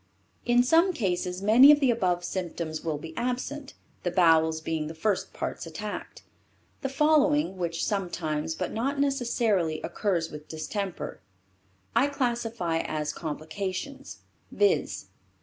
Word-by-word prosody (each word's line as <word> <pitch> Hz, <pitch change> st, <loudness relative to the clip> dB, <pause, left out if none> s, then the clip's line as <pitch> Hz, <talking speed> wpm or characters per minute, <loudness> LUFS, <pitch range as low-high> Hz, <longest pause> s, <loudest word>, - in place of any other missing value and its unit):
In 245 Hz, 0 st, +4 dB
some 330 Hz, +8 st, +4 dB
cases 185 Hz, -, -2 dB
many 245 Hz, +7 st, +8 dB
of 295 Hz, -, +5 dB
the 270 Hz, -4 st, +4 dB
above 180 Hz, -6 st, 0 dB
symptoms 170 Hz, -3 st, -4 dB
will 160 Hz, -2 st, -1 dB
be 160 Hz, +2 st, -9 dB
absent, 255 Hz, +4 st, -3 dB, 0.3 s
the 175 Hz, -, -1 dB
bowels 160 Hz, -2 st, +4 dB
being 160 Hz, -1 st, -2 dB
the 160 Hz, -, -7 dB
first 200 Hz, +4 st, -1 dB
parts -, -, -4 dB
attacked. -, -, -6 dB, 0.6 s
The 270 Hz, -, -2 dB
following, 295 Hz, -4 st, +3 dB
which 170 Hz, -2 st, -2 dB
sometimes, 160 Hz, -6 st, -2 dB
but 180 Hz, -, -3 dB
not 275 Hz, +6 st, -1 dB
necessarily, 235 Hz, -, +1 dB
occur 205 Hz, -3 st, -1 dB, 0.2 s
with 150 Hz, 0 st, -9 dB
distemper, 190 Hz, +4 st, -4 dB, 0.7 s
I 250 Hz, +5 st, +4 dB
classify 235 Hz, -10 st, -1 dB
as 150 Hz, -1 st, -2 dB
complications, 185 Hz, -, -5 dB, 0.3 s
viz. 410 Hz, +1 st, +1 dB
195 Hz, 130 wpm, -27 LUFS, 165-255 Hz, 0.7 s, many